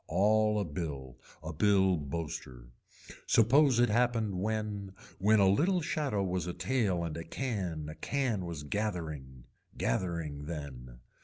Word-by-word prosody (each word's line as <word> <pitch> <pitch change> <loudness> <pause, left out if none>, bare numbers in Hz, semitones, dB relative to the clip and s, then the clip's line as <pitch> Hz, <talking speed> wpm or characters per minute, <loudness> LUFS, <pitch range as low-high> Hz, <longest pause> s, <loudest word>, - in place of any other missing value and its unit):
All 105 +4 +3
a 100 - -1
bill, 70 -5 -5 0.2
a 80 +1 -5
bill 95 +1 +4
boaster. 70 -5 -5 0.6
Suppose 130 +3 +5
it 120 - +4
happened 110 -4 +1
when, 105 -2 -2 0.3
when 105 +3 +4
a 100 - +5
little 170 - +3
shadow 145 -10 -1
was 90 -1 -1
a 90 - -4
tail 105 -10 0
and 85 -2 -3
a 85 - -5
can 90 - -3
a 75 - -6
can 110 - -1
was 80 -4 -5
gathering. 80 - -4 0.3
Gathering 75 -1 -2
then. 65 -6 -7
95 Hz, 140 wpm, -31 LUFS, 75-110 Hz, 0.6 s, Suppose